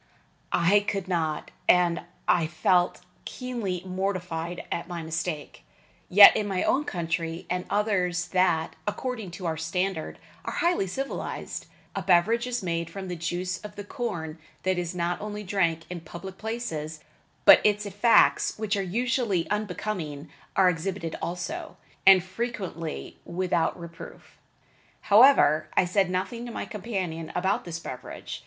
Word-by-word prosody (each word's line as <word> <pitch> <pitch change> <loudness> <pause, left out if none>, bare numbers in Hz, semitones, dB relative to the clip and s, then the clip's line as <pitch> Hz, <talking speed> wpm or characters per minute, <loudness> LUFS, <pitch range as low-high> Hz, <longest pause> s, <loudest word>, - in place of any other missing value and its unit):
I 185 +4 +4
could 200 -2 -3
not; 160 -4 -1 0.2
and 175 -1 +4 0.3
I 170 -3 +3
felt 175 +3 +2 0.2
keenly 230 -9 -4
mortified 180 -3 -3
at 170 - -2
my 175 -2 -5
mistake. 160 - -4 0.5
Yet 200 +2 +10
in 210 - 0
my 190 -2 0
own 290 +3 +2
country 165 - -3
and 180 0 -1
others 185 -4 0
that, 175 -4 +2
according 220 -1 -3
to 185 - -7
our 160 -1 -1
standard, 165 +1 -2 0.3
are - - -4
highly 340 - +1
civilized, 270 +9 -4 0.3
a 195 - -1
beverage 195 +7 +3
is 245 -3 -2
made 170 -2 -2
from 190 +2 -7
the 180 - -3
juice 175 +2 -3
of 210 0 -9
the 205 - -6
corn 170 - -4 0.2
that 185 -1 +1
is 175 0 -3
not 175 0 -1
only 210 0 -5
drank 170 -4 0
in 180 -1 -6
public 180 +4 -9
places, 160 -10 -4 0.4
but - - +10
its 210 0 +2
effects, 205 +4 +4
which 215 -1 -1
are 200 - 0
always 220 -1 0
unbecoming, 180 -7 -3 0.3
are 190 - +5
exhibited 175 -1 -1
also, 175 0 -4 0.3
and 190 -2 +9
frequently 185 -6 -5
without 175 0 0
reproof. 170 0 -11 0.7
However, 155 - +6
I - - +5
said 190 +1 +2
nothing 190 +6 -2
to - - -6
my - - -4
companion 185 -7 -4
about 190 +3 0
this 170 -2 -4
beverage. 130 -6 -7
180 Hz, 145 wpm, -27 LUFS, 170-205 Hz, 0.7 s, Yet